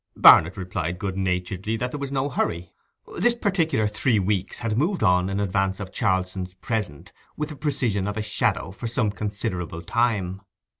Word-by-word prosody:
Barnet 80 +4 +8
replied 90 -2 -3
good 95 0 -3
naturedly 95 +3 -1
that 125 +2 -2
there 145 - -5
was 140 -1 -4
no 135 0 0
hurry. 85 -10 -2 0.5
This 240 0 +3
particular 165 - +1
three 110 +2 +1
weeks 100 0 -1
had 115 -2 -2
moved 170 - +1
on 90 -1 +3
in 100 +1 -1
advance 95 -1 0
of 95 -2 -6
Charlson's 95 -3 -1
present 105 -10 -4 0.2
with 150 0 -2
the 150 - -7
precision 125 -9 0
of 105 +1 -3
a 110 - -1
shadow 100 -3 0
for 105 +5 -6
some 115 -2 0
considerable 95 -5 -4
time. 100 -4 0
100 Hz, 170 wpm, -24 LUFS, 95-120 Hz, 0.5 s, Barnet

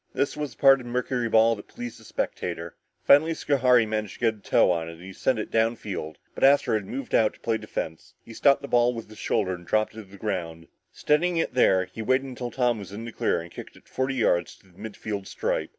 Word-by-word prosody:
This 140 +2 0
was 150 -5 -5
the - - -38
part 135 -1 +6
of 120 - -10
mercuryball 120 -2 +2
that 105 - -12
pleased 120 -1 -8
the - - -16
spectator. 85 -5 -4 0.3
Finally, 160 +3 +5
Schohari 125 -6 +3
managed 110 -2 -3
to - - -17
get 115 -2 +3
a 110 - -18
toe 95 - +3
on 85 -1 -2
it - - -8
and 85 - -14
he 95 +1 -9
sent 130 +5 0
it 105 - -4
down 115 +1 +2
field, 85 -9 -6 0.2
but - - -5
Astro 140 -2 +5
had 105 -3 -1
moved 130 +3 -6
out 110 -1 +3
to - - -23
play 115 -1 0
defense. 80 -6 -6
He 115 - -11
stopped 140 +4 +3
the - - -5
ball 120 -1 +2
on 115 - -5
his 110 0 -14
shoulder 100 -4 0
and 90 -1 -8
dropped 110 +6 0
it - - -14
to 110 - -7
the 100 +1 -15
ground. 85 -5 -4 0.2
Steadying 170 +4 +1
it 165 - -1
there, 95 -7 +4
he 95 +5 -9
waited 130 +4 +1
until 125 -2 -5
Tom 120 -3 0
was 100 -1 -9
in 110 +3 -7
the 115 - -6
clear - - 0
and 85 +1 -11
kicked - - -10
it - - -20
forty 130 +1 -2
yards 90 -8 +1
to 95 - -25
the 90 - -22
mid 110 -2 -8
field 100 -3 -5
stripe. - - -2
110 Hz, 255 wpm, -26 LUFS, 95-125 Hz, 0.3 s, part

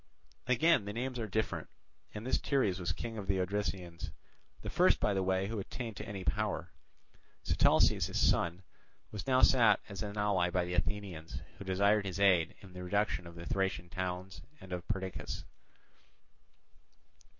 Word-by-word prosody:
Again 130 0 +4
the 100 - -4
names 125 +2 -3
are 110 - -2
different; 110 +2 -1 0.4
and 105 +2 -7
this 130 - +2
Teres 105 -10 +1
was 85 - -1
king 115 -2 -4
of 100 - -6
the 95 - +2
Odrysians, 90 -3 -2 0.5
the - - -4
first - - +4
by 105 - +2
the 95 - +1
way 95 0 +1
who 110 +1 -3
attained 115 +2 -5
to - - -6
any 100 -2 -5
power. 75 - -1 0.7
Sitalces, - - +4
his - - -2
son, 85 +3 +2 0.5
was 100 -2 -6
now 130 -1 +4
sought 115 -6 +6
as 100 - -6
an 105 0 -4
ally 100 -4 +2
by 90 0 +1
the 90 - -4
Athenians, 90 -2 -3 0.2
who 100 - -7
desired 100 +2 +3
his 95 +1 -4
aid 90 -5 +4
in 95 -3 -13
the 90 0 -7
reduction 90 -3 0
of 85 - -11
the 85 0 -8
Thracian 95 -2 -1
towns 95 +1 -4 0.2
and 95 -1 -8
of 90 0 -5
Perdiccas. 95 -3 -4
95 Hz, 170 wpm, -33 LUFS, 90-105 Hz, 0.7 s, sought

